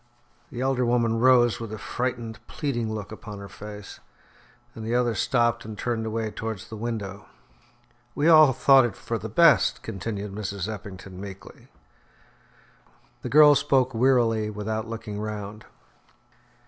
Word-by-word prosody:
The 120 Hz, -, -6 dB
elder 130 Hz, -1 st, +1 dB
woman 120 Hz, -1 st, +1 dB
rose, 120 Hz, -2 st, +4 dB
with 115 Hz, -2 st, -6 dB
a 110 Hz, -, -5 dB
frightened 120 Hz, 0 st, -4 dB
pleading 120 Hz, -6 st, -3 dB
look 105 Hz, -2 st, -6 dB
upon 105 Hz, -1 st, -9 dB
her 100 Hz, 0 st, -9 dB
face, 105 Hz, 0 st, -10 dB, 0.7 s
and 110 Hz, -, -8 dB
the 115 Hz, +2 st, -1 dB
other 120 Hz, -1 st, +2 dB
stopped 120 Hz, +1 st, +1 dB
and 110 Hz, -1 st, -8 dB
turned 115 Hz, 0 st, -2 dB
away 110 Hz, 0 st, -3 dB
towards 110 Hz, -4 st, -6 dB
the 110 Hz, -, -8 dB
window. 105 Hz, -3 st, -5 dB, 0.9 s
"We 145 Hz, -, +1 dB
all 155 Hz, -4 st, +8 dB
thought 135 Hz, +1 st, +5 dB
it 120 Hz, -4 st, -2 dB
for 115 Hz, -1 st, -4 dB
the 110 Hz, +3 st, -6 dB
best," 135 Hz, -, +4 dB
continued 100 Hz, +1 st, -5 dB
Mrs. 100 Hz, -2 st, -4 dB
Eppington 100 Hz, -3 st, -8 dB
meekly. 100 Hz, -1 st, -11 dB, 1.5 s
The -, -, -5 dB
girl 150 Hz, 0 st, +8 dB
spoke 135 Hz, -2 st, +2 dB
wearily 115 Hz, -3 st, +2 dB
without 110 Hz, +1 st, -4 dB
looking 110 Hz, -2 st, -6 dB
round. 105 Hz, 0 st, -6 dB
110 Hz, 145 wpm, -25 LUFS, 105-120 Hz, 1.5 s, all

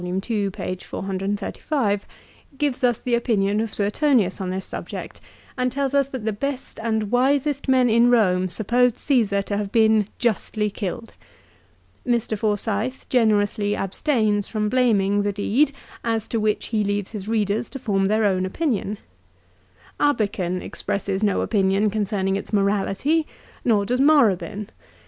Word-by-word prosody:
ii., 195 Hz, +3 st, -1 dB
p. 185 Hz, -1 st, -4 dB
435) 200 Hz, -, -2 dB, 0.5 s
gives 275 Hz, -2 st, -1 dB
us 240 Hz, -2 st, +3 dB
the 250 Hz, -, -2 dB
opinion 215 Hz, -3 st, +1 dB
of 225 Hz, -1 st, -3 dB
Suetonius 210 Hz, -2 st, +1 dB
on 185 Hz, -, -3 dB
this 190 Hz, +1 st, -3 dB
subject -, -, -7 dB, 0.3 s
and 250 Hz, -1 st, 0 dB
tells 275 Hz, +1 st, -1 dB
us 280 Hz, -1 st, +2 dB
that 260 Hz, -5 st, -6 dB
the 220 Hz, -, 0 dB
best 275 Hz, +5 st, -5 dB
and 220 Hz, -2 st, -1 dB
wisest 280 Hz, +3 st, +1 dB
men 260 Hz, -1 st, +4 dB
in 235 Hz, +1 st, +4 dB
Rome 185 Hz, -6 st, +3 dB
supposed 240 Hz, +5 st, +1 dB
Caesar 220 Hz, -8 st, +1 dB
to 200 Hz, +1 st, -3 dB
have 205 Hz, -1 st, -3 dB
been 220 Hz, -2 st, +4 dB
justly 215 Hz, -2 st, -1 dB
killed. 220 Hz, +3 st, -5 dB, 0.9 s
Mr. 235 Hz, -3 st, 0 dB
Forsyth 215 Hz, +3 st, -2 dB
generously 210 Hz, -3 st, +2 dB
abstains 210 Hz, -, 0 dB
from 210 Hz, -1 st, -1 dB
blaming 205 Hz, -5 st, +2 dB
the 205 Hz, 0 st, 0 dB
deed 225 Hz, +8 st, +1 dB, 0.3 s
as 225 Hz, -2 st, -1 dB
to 230 Hz, -, 0 dB
which 215 Hz, 0 st, -1 dB
he 215 Hz, -2 st, +1 dB
leaves 205 Hz, -1 st, -2 dB
his 205 Hz, -3 st, -6 dB
readers 215 Hz, 0 st, 0 dB
to 275 Hz, -, -7 dB
form 195 Hz, -6 st, 0 dB
their 215 Hz, +1 st, +2 dB
own 185 Hz, -2 st, +2 dB
opinion. 210 Hz, -, -1 dB, 1.0 s
Abeken 200 Hz, -10 st, 0 dB
expresses 195 Hz, 0 st, -3 dB
no 205 Hz, -2 st, +2 dB
opinion 200 Hz, 0 st, +2 dB
concerning 200 Hz, -2 st, -1 dB
its 200 Hz, -, -5 dB
morality, 210 Hz, +10 st, +1 dB, 0.4 s
nor 210 Hz, -4 st, +2 dB
does 250 Hz, +5 st, 0 dB
Morabin. 210 Hz, -, +3 dB
215 Hz, 145 wpm, -23 LUFS, 200-245 Hz, 1.0 s, men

